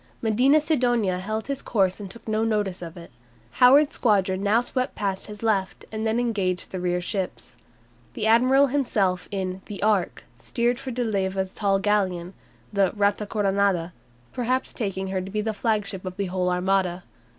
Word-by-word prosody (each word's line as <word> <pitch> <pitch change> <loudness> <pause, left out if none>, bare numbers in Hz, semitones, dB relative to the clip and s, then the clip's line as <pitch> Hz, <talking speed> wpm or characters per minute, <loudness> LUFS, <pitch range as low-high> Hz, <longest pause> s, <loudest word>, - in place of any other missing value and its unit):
Medina 250 +7 +4
Sidonia 240 - +1
held 215 +3 -3
his 275 -1 -3
course 190 -4 +1
and 200 -2 -7
took 230 +5 -13
no 215 0 +1
notice 210 -5 -1
of 170 0 -8
it. 170 - -11 0.5
Howard's 285 +4 +7
squadron 195 -4 +1
now 205 +3 +3
swept 255 +2 -2
past 195 -2 -2
his 210 0 -9
left, 200 -4 0
and 220 0 -2
then 220 +2 +1
engaged 200 -7 -1
his 185 - -4
rear 180 0 0
ships. 185 +1 -4 0.6
The 215 - -2
admiral 255 +5 +5
himself 215 -10 0
in 190 -1 -3
"The 200 -1 -6
Ark" 210 -4 +1 0.2
steered 240 - 0
for 265 - -6
De 250 0 -2
Leyva's 190 -3 -1
tall 200 -2 +1
galleon, 195 -3 0 0.4
the 195 -2 +3
"Rata 205 0 +1
Coronada," 195 -4 +1 0.4
perhaps 255 +1 -1
taking 195 -4 -3
her 190 -1 -1
to 185 - -7
be 210 +2 -1
the 220 +1 -2
flagship 205 -3 -1
of 185 0 -6
the 200 - -1
whole 180 0 -1
Armada. 180 0 0
205 Hz, 175 wpm, -25 LUFS, 190-225 Hz, 0.6 s, Howard's